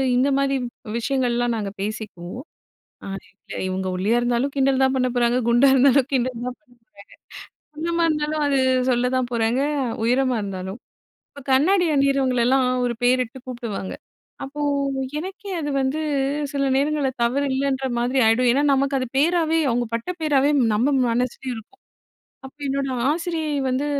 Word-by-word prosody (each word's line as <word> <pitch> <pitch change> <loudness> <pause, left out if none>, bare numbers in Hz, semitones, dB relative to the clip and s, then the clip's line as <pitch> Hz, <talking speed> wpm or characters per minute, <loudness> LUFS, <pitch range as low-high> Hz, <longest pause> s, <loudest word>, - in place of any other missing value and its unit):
இந்த 255 +2 +3
மாரி 275 0 +1
வ் 230 -2 -10
விஷயங்கள்ல்லாம் 240 -1 0
நாங்க 205 -2 -3
பேசிக்குவோம். 210 +1 -6 0.7
அது 195 - -7
எங்கள 195 - -12
இவுங்க 185 0 -2
ஒல்லியா 205 +6 +1
இருந்தாலும் 245 +3 0
கிண்டல் 270 -1 +2
தான் 265 0 +2
பண்ணப்போறாங்க, 245 -1 +1
குண்டா 240 +4 +5
இருந்தாலும் 270 0 +4
கிண்டல் 250 -2 -1
தான் 250 0 -4
பண்ணப்போறாங்க. 250 -5 -27 1.0
குள்ளமா 335 +2 -1
இருந்தாலும் 305 0 -1
அது 280 -1 +1 0.3
சொல்லதான் 250 +1 +1
போறாங்க, 230 +2 +1 0.4
உயரமா 255 +1 +2
இருந்தாலும். 190 +1 -5 0.5
இப்ப 285 - -12
கண்ணாடி 355 +8 +4
அணியிறவங்களல்லாம் 265 -2 +2 0.2
ஒரு 240 - -1
பேரிட்டு 250 0 +1
கூப்புடுவாங்க. 235 -6 -5 0.5
அப்போ, 275 +2 -8 0.6
எனக்கே 385 +4 -7
அது 295 - -3
வந்து 265 +3 -1 0.5
சில 275 -1 0
நேரங்கள்ல 285 0 +1
தவறில்லைன்ற 270 +1 0
மாதிரி 250 +3 +1
ஆயிடும். 235 +3 +3
ஏன்னா, 270 +4 +2
நமக்கு 275 +1 +1
அது 255 - -2
பேராவே 325 +2 +2
அவுங்க 240 0 0
பட்ட 230 +7 -3
பேராவே 290 -2 +3 0.3
நம்ம 240 +7 +2 0.2
மனசுலயும் 250 +1 -2
இருக்கும். 300 - -14 0.7
அப்ப 265 - -15
என்னோட 275 0 -1 0.2
ஆசிரியை 320 -1 -2
வந்து 260 +3 0
260 Hz, 140 wpm, -22 LUFS, 240-280 Hz, 1.0 s, குண்டா